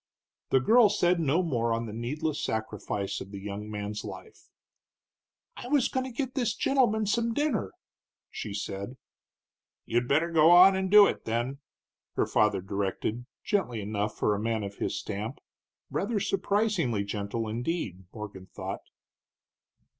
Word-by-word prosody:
The 130 Hz, -, +4 dB
girl 225 Hz, -, +6 dB
said 180 Hz, -4 st, +2 dB
no 160 Hz, +3 st, +2 dB
more 120 Hz, -8 st, 0 dB
on 115 Hz, +1 st, 0 dB
the 105 Hz, -, -7 dB
needless 145 Hz, +7 st, -2 dB
sacrifice 105 Hz, -2 st, -3 dB
of 95 Hz, -, -8 dB
the 100 Hz, -, -7 dB
young 105 Hz, +1 st, -6 dB
man's 105 Hz, 0 st, -4 dB
life. -, -, -10 dB, 1.1 s
"I -, -, -8 dB
was 280 Hz, -1 st, +3 dB
goin' 260 Hz, 0 st, -1 dB
to 260 Hz, -, -6 dB
get 255 Hz, +1 st, -3 dB
this 240 Hz, -6 st, 0 dB
gentleman 235 Hz, -6 st, +2 dB
some 230 Hz, +2 st, 0 dB
dinner," 280 Hz, -, 0 dB, 0.6 s
she 105 Hz, -, -5 dB
said. 100 Hz, +4 st, -5 dB, 0.9 s
"You'd 120 Hz, +1 st, 0 dB
better 160 Hz, +5 st, +2 dB
go 160 Hz, 0 st, +6 dB
on 180 Hz, +2 st, +8 dB
and 190 Hz, 0 st, -1 dB
do 205 Hz, +1 st, +9 dB
it, -, -, -2 dB
then," 120 Hz, +5 st, -2 dB, 0.6 s
her -, -, +2 dB
father 105 Hz, -3 st, +2 dB
directed, 100 Hz, +5 st, -3 dB, 0.2 s
gently 185 Hz, -, 0 dB
enough 105 Hz, +1 st, -2 dB
for 105 Hz, -, +2 dB
a 100 Hz, -, -2 dB
man 110 Hz, -1 st, -1 dB
of 100 Hz, 0 st, -6 dB
his -, -, -2 dB
stamp, 105 Hz, +6 st, -4 dB, 0.5 s
rather 230 Hz, -3 st, 0 dB
surprisingly 195 Hz, -, +1 dB
gentle, 100 Hz, +2 st, -3 dB
indeed, 115 Hz, -, -3 dB
Morgan 105 Hz, -4 st, -8 dB
thought. -, -, -6 dB
120 Hz, 150 wpm, -28 LUFS, -, 1.1 s, do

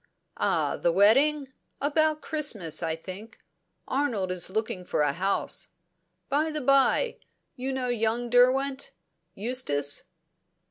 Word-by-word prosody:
"Ah -, -, 0 dB
the 170 Hz, -, +1 dB
wedding? 265 Hz, -, +3 dB, 0.3 s
About 305 Hz, +1 st, +1 dB
Christmas, 215 Hz, -, -1 dB
I 160 Hz, -1 st, -1 dB
think. 195 Hz, +7 st, -10 dB, 0.5 s
Arnold 240 Hz, -9 st, -1 dB
is 185 Hz, -1 st, +2 dB
looking 205 Hz, -2 st, -3 dB
for 175 Hz, -, -1 dB
a 145 Hz, -1 st, +2 dB
house. 195 Hz, +5 st, -2 dB, 0.6 s
By 300 Hz, +3 st, +1 dB
the 305 Hz, -1 st, -3 dB
bye, 275 Hz, -, +3 dB, 0.4 s
you 260 Hz, 0 st, -3 dB
know 260 Hz, -1 st, -2 dB
young 235 Hz, +1 st, 0 dB
Derwent 265 Hz, +2 st, +3 dB, 0.4 s
Eustace?" 190 Hz, -, -1 dB
245 Hz, 120 wpm, -27 LUFS, 190-280 Hz, 0.6 s, wedding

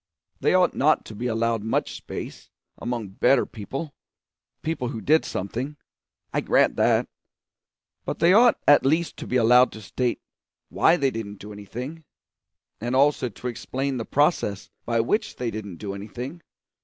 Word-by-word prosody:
They -, -, +2 dB
ought 180 Hz, -1 st, +4 dB
not 155 Hz, +3 st, +2 dB
to 110 Hz, -, -9 dB
be 120 Hz, +4 st, -3 dB
allowed 115 Hz, -1 st, 0 dB
much 110 Hz, +2 st, -1 dB
space -, -, -8 dB, 0.3 s
among 120 Hz, -4 st, -3 dB
better 120 Hz, +7 st, +3 dB
people 135 Hz, +8 st, -6 dB, 0.7 s
people 155 Hz, -6 st, -2 dB
who 115 Hz, -, -4 dB
did 155 Hz, +9 st, +3 dB
something 125 Hz, +10 st, -4 dB, 0.6 s
I -, -, +1 dB
grant -, -, +3 dB
that; -, -, +3 dB, 1.0 s
but -, -, -4 dB
they 170 Hz, +2 st, +5 dB
ought 235 Hz, +3 st, +6 dB
at 145 Hz, -, +7 dB
least 160 Hz, +5 st, +1 dB
to -, -, -7 dB
be 125 Hz, -, -2 dB
allowed 125 Hz, +1 st, +6 dB
to 110 Hz, -, -9 dB
state 125 Hz, +4 st, -1 dB, 0.5 s
why 170 Hz, -, +4 dB
they 135 Hz, -3 st, +1 dB
didn't 105 Hz, -3 st, -6 dB
do 105 Hz, +2 st, -10 dB
anything, 125 Hz, +10 st, -7 dB, 0.8 s
and 120 Hz, +4 st, -2 dB
also 140 Hz, -2 st, +3 dB
to 120 Hz, +3 st, -7 dB
explain 130 Hz, +3 st, -3 dB
the 115 Hz, -, -4 dB
process 145 Hz, -, +1 dB, 0.2 s
by 115 Hz, -1 st, +2 dB
which 210 Hz, -, -1 dB
they 120 Hz, -2 st, -3 dB
didn't 100 Hz, -5 st, -6 dB
do 100 Hz, +1 st, -5 dB
anything. 125 Hz, -, -7 dB
125 Hz, 160 wpm, -25 LUFS, 110-145 Hz, 1.0 s, at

